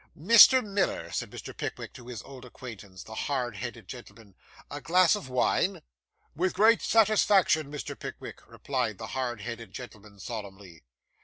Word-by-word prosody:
'Mr. 230 Hz, -, +7 dB
Miller,' 200 Hz, -1 st, -1 dB
said -, -, -3 dB
Mr. -, -, -9 dB
Pickwick -, -, -6 dB
to 125 Hz, -, -13 dB
his 120 Hz, -4 st, -7 dB
old 135 Hz, -2 st, -12 dB
acquaintance, 110 Hz, -6 st, -11 dB
the 110 Hz, -, -11 dB
hard 125 Hz, -2 st, -2 dB
headed 115 Hz, -2 st, -7 dB
gentleman, 115 Hz, -3 st, -12 dB, 0.4 s
'a 145 Hz, 0 st, -6 dB
glass 180 Hz, +3 st, +4 dB
of 140 Hz, -11 st, -7 dB
wine?' 125 Hz, -1 st, 0 dB, 0.5 s
'With 180 Hz, +4 st, -1 dB
great 220 Hz, +4 st, +5 dB
satisfaction, 195 Hz, -8 st, +3 dB
Mr. 150 Hz, -, -6 dB
Pickwick,' -, -, -9 dB
replied -, -, -3 dB
the -, -, -7 dB
hard 120 Hz, -4 st, -3 dB
headed 115 Hz, -2 st, -7 dB
gentleman 105 Hz, -4 st, -11 dB
solemnly. 100 Hz, -7 st, -8 dB
125 Hz, 150 wpm, -28 LUFS, 110-185 Hz, 0.5 s, Mr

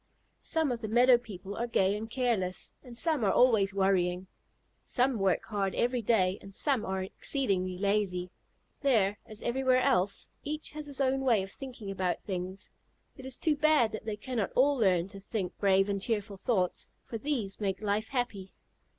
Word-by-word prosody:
Some 320 Hz, -4 st, 0 dB
of 235 Hz, -1 st, -3 dB
the 220 Hz, -, -3 dB
meadow 240 Hz, +2 st, +5 dB
people 200 Hz, -4 st, -8 dB
are 235 Hz, -, -2 dB
gay 195 Hz, -4 st, +2 dB
and 220 Hz, +2 st, -5 dB
careless, 225 Hz, -7 st, -1 dB
and 245 Hz, -2 st, -9 dB
some 310 Hz, -3 st, +2 dB
are 195 Hz, -, +3 dB
always 220 Hz, -6 st, +4 dB
worrying. 190 Hz, -2 st, +1 dB, 0.6 s
Some 250 Hz, -2 st, +1 dB
work 195 Hz, -2 st, +1 dB
hard 200 Hz, -3 st, -1 dB
every 245 Hz, 0 st, +1 dB
day, 195 Hz, -4 st, +2 dB
and 195 Hz, -1 st, -9 dB
some 275 Hz, -7 st, +2 dB
are 190 Hz, 0 st, -2 dB
exceedingly 190 Hz, -4 st, -1 dB
lazy. 195 Hz, -2 st, 0 dB, 0.5 s
There, 215 Hz, -8 st, +2 dB
as 215 Hz, 0 st, -9 dB
everywhere 255 Hz, +1 st, +2 dB
else, 185 Hz, +2 st, +1 dB, 0.2 s
each 305 Hz, +1 st, -3 dB
has 300 Hz, 0 st, -6 dB
his 280 Hz, -1 st, -5 dB
own 270 Hz, 0 st, +2 dB
way 235 Hz, -7 st, +3 dB
of 195 Hz, -, -8 dB
thinking 245 Hz, -6 st, -7 dB
about 185 Hz, -2 st, -2 dB
things. 185 Hz, 0 st, -5 dB, 0.4 s
It 265 Hz, -1 st, -9 dB
is 265 Hz, -, -1 dB
too 310 Hz, -2 st, +2 dB
bad 295 Hz, -6 st, +3 dB
that 215 Hz, -, -6 dB
they 215 Hz, -2 st, -2 dB
cannot 225 Hz, -1 st, -3 dB
all 280 Hz, +3 st, +4 dB
learn 185 Hz, -7 st, +2 dB
to 195 Hz, -, -9 dB
think 195 Hz, -2 st, -4 dB
brave 195 Hz, -1 st, +4 dB
and 200 Hz, -1 st, -1 dB
cheerful 210 Hz, -2 st, -1 dB
thoughts, 190 Hz, -3 st, -1 dB, 0.2 s
for 225 Hz, -, -5 dB
these 235 Hz, -8 st, -2 dB
make 195 Hz, -2 st, -1 dB
life 210 Hz, +1 st, -1 dB
happy. 230 Hz, -7 st, -3 dB
215 Hz, 180 wpm, -30 LUFS, 195-250 Hz, 0.6 s, meadow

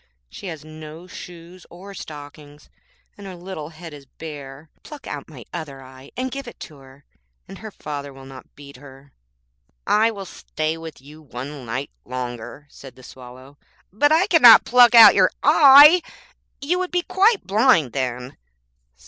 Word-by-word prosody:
She -, -, -10 dB
has 160 Hz, -3 st, -9 dB
no 155 Hz, +2 st, -12 dB
shoes 175 Hz, 0 st, -13 dB
or 190 Hz, +3 st, -13 dB
stockings, 145 Hz, -3 st, -13 dB, 0.5 s
and 200 Hz, -, -10 dB
her 185 Hz, -, -9 dB
little 175 Hz, -4 st, -9 dB
head 165 Hz, 0 st, -12 dB
is 140 Hz, -2 st, -14 dB
bare. 145 Hz, -1 st, -11 dB
Pluck 295 Hz, -2 st, -13 dB
out 145 Hz, +1 st, -8 dB
my 130 Hz, -8 st, -13 dB
other 140 Hz, -6 st, -8 dB
eye, 130 Hz, +1 st, -16 dB
and 255 Hz, +1 st, -4 dB
give 275 Hz, -1 st, -8 dB
it 240 Hz, -, -12 dB
to 155 Hz, -, -11 dB
her, 135 Hz, +1 st, -19 dB, 0.4 s
and 195 Hz, +1 st, -12 dB
her 220 Hz, -, -9 dB
father 145 Hz, -7 st, -8 dB
will 135 Hz, 0 st, -15 dB
not 135 Hz, -1 st, -15 dB
beat 140 Hz, -2 st, -14 dB
her. 135 Hz, 0 st, -17 dB, 0.7 s
'I 220 Hz, +2 st, +2 dB
will 200 Hz, -3 st, -8 dB
stay 155 Hz, -3 st, -5 dB
with 165 Hz, -4 st, -11 dB
you 150 Hz, +3 st, -15 dB
one 135 Hz, -1 st, -10 dB
night 130 Hz, +5 st, -5 dB
longer,' 125 Hz, +2 st, -8 dB
said 135 Hz, -3 st, -14 dB
the 130 Hz, -, -18 dB
Swallow,'but 130 Hz, -, -6 dB
I 325 Hz, +4 st, +3 dB
cannot 295 Hz, -, +6 dB
pluck 245 Hz, -1 st, +5 dB
out 225 Hz, -3 st, +9 dB
your 185 Hz, -2 st, +3 dB
eye. 295 Hz, +3 st, +7 dB, 0.6 s
You 345 Hz, +6 st, -1 dB
would 370 Hz, -1 st, -3 dB
be 355 Hz, -1 st, -2 dB
quite 405 Hz, +4 st, +1 dB
blind 200 Hz, -, +2 dB
then.' 125 Hz, -1 st, -5 dB
155 Hz, 165 wpm, -20 LUFS, 135-210 Hz, 0.7 s, out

